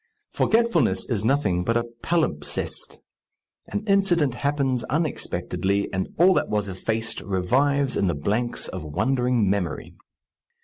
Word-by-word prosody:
Forgetfulness 170 - +2
is 105 -3 0
nothing 110 -9 +1
but 115 +4 +1
a 120 - 0 0.2
palimpsest: 155 - -2 0.7
an 100 - -3
incident 175 -9 +2
happens 135 -2 0
unexpectedly, 100 - -1
and 95 0 -1
all 185 +3 +6
that - - 0
was 105 -1 0
effaced 110 +4 -3
revives 130 +9 +1
in 100 - +1
the 85 - 0
blanks 110 +11 -1
of - - -6
wondering 125 - +1
memory. 95 -5 -2
120 Hz, 125 wpm, -24 LUFS, 100-145 Hz, 0.7 s, all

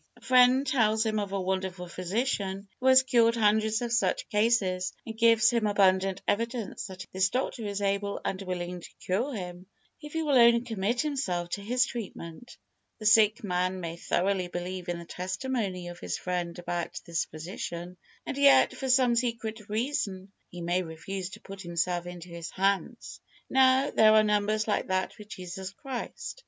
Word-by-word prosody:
A - - -20
friend 255 +1 +5
tells 225 -5 +2
him 215 -1 0
of 200 -2 -3
a 195 - -1
wonderful 185 -1 -3
physician 195 +1 -2
who 260 - 0
has 260 0 +7
cured 235 -3 +3
hundreds 220 +1 +2
of 235 -1 -2
such 240 - +1
cases, 210 -4 +1
and 225 - -6
gives 230 0 +5
him 230 -3 +1
abundant 195 -1 +2
evidence 230 +1 -2
that 185 -1 -9
this 190 +1 +2
doctor 245 -2 -2
is 205 0 -3
able 200 0 -1
and 190 - -2
willing 180 -1 -4
to - - -11 0.2
cure 225 +10 0
him, 180 -2 -7 0.3
if 295 -1 -10
he 325 0 -1
will 285 -4 +4
only 235 0 +6
commit 230 0 -1
himself 200 - -2
to 200 - -3
his 245 +4 +2
treatment. 215 -3 -8 0.4
The 215 - -9
sick 215 0 +5
man 185 -1 -1
may 165 -2 -5
thoroughly 185 +2 0
believe 175 0 -5
in 175 - -2
the 170 - -9
testimony 185 0 -3
of 175 - -10
his 90 -1 -3
friend 175 -1 -3
about 175 -1 -4
this 170 -1 -1
physician, 170 +2 -7 0.3
and 275 - -4
yet, 280 -1 +6
for 265 - -4
some 250 -2 +4
secret 230 -3 -2
reason, 210 -5 -2 0.2
he 175 - -9
may 175 +2 0
refuse 180 +3 -6
to - - -11
put 195 0 -9
himself 175 0 -2
into 175 0 -9
his 170 0 -7
hands. 195 +4 -1 0.3
Now, 265 +1 +4
there 215 0 +6
are 215 0 +6
numbers 210 +1 +1
like 210 - 0
that 185 +2 -1
with 210 - -11
Jesus 185 -2 -6
Christ. 265 - -6
200 Hz, 175 wpm, -28 LUFS, 180-235 Hz, 0.4 s, has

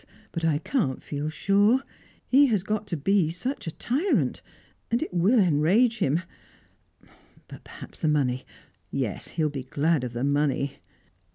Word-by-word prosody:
But 165 - -4
I 160 -3 +2
can't 165 - -1
feel 145 +1 -4
sure. 205 +10 +3 0.4
He 280 +2 +5
has 210 -7 +1
got 215 0 -2
to 170 - -2
be 185 +2 +2
such 215 - -4
a - - -2
tyrant, 280 - 0 0.5
and 235 - +1
it 320 - -7
will 185 +8 +3
enrage 195 +7 +3
him 155 +6 +1 1.2
But - - -12
perhaps - - -12
the 160 - +1
money 130 -4 +1 0.5
Yes, 125 -6 -3
he 165 - -2
will 150 - +1
be 140 -2 -4
glad 145 +3 0
of 125 -2 -4
the 120 +1 -3
money." 140 -1 0
165 Hz, 160 wpm, -26 LUFS, 145-215 Hz, 1.2 s, He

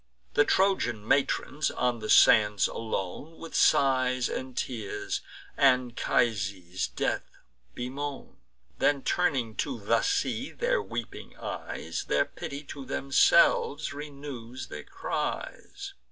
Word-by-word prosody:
The 145 - +4
Trojan 125 - +1
matrons, 140 +2 +1
on 125 -1 0
the 110 - -6
sands 105 -3 +6
alone, 115 - -5
With 165 - -9
sighs 130 -2 +3
and 130 -1 -5
tears 110 -6 -3 0.4
Anchises' 115 -8 +1
death - - -2 0.5
bemoan; 135 +3 -5 0.4
Then, 140 -2 +2
turning 135 -11 +1
to - - -2
the 105 +3 +2
sea 405 0 -1
their - - +1
weeping - - -7
eyes, - - -5
Their - - +2
pity 140 +1 -7
to 140 -1 -8
themselves 140 +2 +3
renews 140 -4 -8
their - - -8
cries. 395 0 -5
130 Hz, 110 wpm, -28 LUFS, 115-145 Hz, 0.5 s, sands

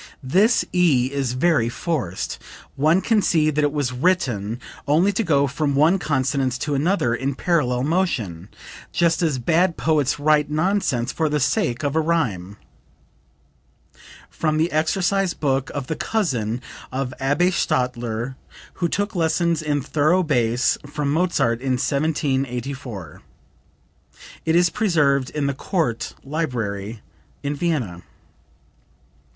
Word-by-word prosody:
"This 200 - +3
E 145 -8 +3
is 135 -3 -1
very 130 -3 +2
forced. 120 - -3 0.4
One 155 +6 +3
can 220 0 +2
see 155 -5 +2
that 150 0 0
it 145 - +2
was 145 -4 -1
written 125 - 0 0.3
only 165 +8 +3
to 205 +3 -1
go 145 -6 +3
from 140 +1 -1
one 160 +7 +4
consonance 135 -4 0
to 150 - -2
another 140 -4 +1
in 135 +3 -2
parallel 130 -7 +1
motion, 125 - -1 0.4
just 170 0 +2
as 155 -6 +1
bad 170 +7 +2
poets 150 -3 +1
write 150 0 +3
nonsense 155 -7 0
for 160 -2 0
the 150 0 0
sake 120 -3 0
of 145 +1 -1
a - - +4
rhyme." 120 - -1 1.7
(From 155 -1 -1
the 160 +2 +1
exercise 180 +4 +1
book 135 -2 0
of 140 -2 -4
the 160 - -3
cousin 125 - -1 0.3
of 130 0 -3
Abbe 145 +7 +2
Stadler 120 -5 -1 0.5
who 170 - +2
took 205 +5 -1
lessons 165 -1 +1
in 145 -3 -1
thorough 155 +6 +2
bass 120 -5 +1
from 145 -1 -2
Mozart 140 -9 +1
in 130 -1 0
1784. 135 - -2 1.3
It 160 - +3
is 175 0 +4
preserved 150 -11 +2
in 150 -2 -2
the 140 - 0
Court 135 - -2
Library 115 -8 -3 0.4
in 140 - -1
Vienna.) 140 - -2
145 Hz, 130 wpm, -22 LUFS, 125-165 Hz, 1.7 s, one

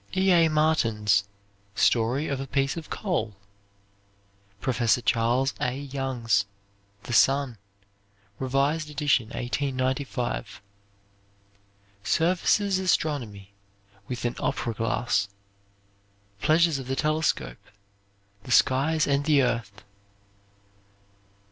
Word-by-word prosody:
E. 190 0 +3
A. 165 -2 +5
Martin's 115 -10 +2 0.5
"Story 120 +8 +2
of 140 -2 -2
a 135 - -6
Piece 135 +1 0
of 165 -2 -8
Coal." 135 - -2 1.2
Professor 120 -1 +1
Charles 120 +3 +1
A. 125 0 -1
Young's 130 -7 -1 0.6
"The 120 - -6
Sun," 135 -2 +3 0.8
revised 140 +4 0
edition 145 -6 +1
1895. 130 +1 -3 1.4
Serviss' 185 - +2
"Astronomy 120 - -1 0.5
with 125 -1 -5
an 120 - -1
Opera 115 - -2
Glass," 115 -2 0 1.1
"Pleasures 160 -2 +3
of 130 - -8
the 135 - -1
Telescope," 155 - -1 0.8
"The 100 - -14
Skies 145 +6 +3
and 140 0 +1
the 145 -3 +4
Earth." 110 -4 -3
135 Hz, 90 wpm, -26 LUFS, 115-150 Hz, 1.4 s, A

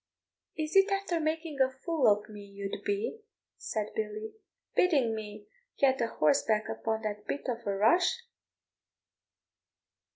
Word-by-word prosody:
"Is 310 +1 -3
it 390 +1 +6
after 395 -4 0
making 315 -2 -2
a 260 - +5
fool 270 +3 0
of 210 0 +3
me 210 -1 -10
you'd 200 0 -6
be," 410 +3 -2 0.4
said 215 -1 -4
Billy, 215 0 -4 0.4
"bidding 275 -11 +3
me 210 -1 -7 0.3
get 265 -2 +3
a 230 - +2
horseback 215 +5 +2
upon 220 0 -2
that 210 -1 -4
bit 285 - -3
of 235 -3 -3
a 200 - 0
rush? 350 - +3
235 Hz, 135 wpm, -30 LUFS, 210-325 Hz, 0.4 s, it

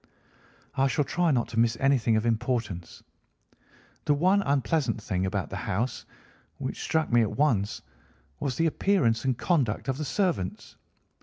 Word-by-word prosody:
"I 135 +1 +2
shall 145 +2 0
try 175 +3 +1
not 125 -6 +1
to 115 -1 -2
miss 115 0 +2
anything 130 -5 +3
of 110 +1 0
importance. 115 -6 -2 1.0
The 145 - +3
one 185 +7 +3
unpleasant 140 - 0
thing 95 -4 -2
about 95 -1 -3
the - - -4
house, 115 +7 -3 0.5
which - - -5
struck 160 -3 0
me 120 - +6
at 110 - -1
once, 115 -9 +1 0.6
was 130 -3 -2
the 165 - +1
appearance 155 - +2
and 130 -3 +1
conduct 140 - 0
of 135 +2 -1
the 155 - -2
servants. 170 - -2
125 Hz, 155 wpm, -27 LUFS, 110-150 Hz, 1.0 s, me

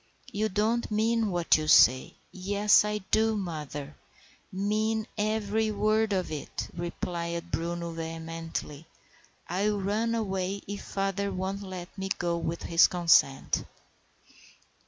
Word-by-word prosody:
You 215 +2 0
don't 215 +4 0
mean 220 +1 +1
what 175 -4 +3
you 155 - -3
say." 130 -2 +5 0.2
"Yes, 205 +3 +3
I 210 0 -2
do, 220 0 +3
mother—mean 190 +6 -4
every 215 0 0
word 215 +1 +1
of 185 -4 -1
it," 150 -2 -5
replied 170 0 -4
Bruno 170 0 -3
vehemently. 165 -1 -6 0.6
"I'll 205 +4 0
run 215 +4 0
away 195 -2 -2
if 200 +1 -5
father 195 0 -2
won't 190 +1 -3
let 185 -2 -8
me 195 0 -3
go 175 -1 0
with 170 0 -3
his 165 0 +5
consent." 170 -6 +3
190 Hz, 115 wpm, -28 LUFS, 170-210 Hz, 0.6 s, say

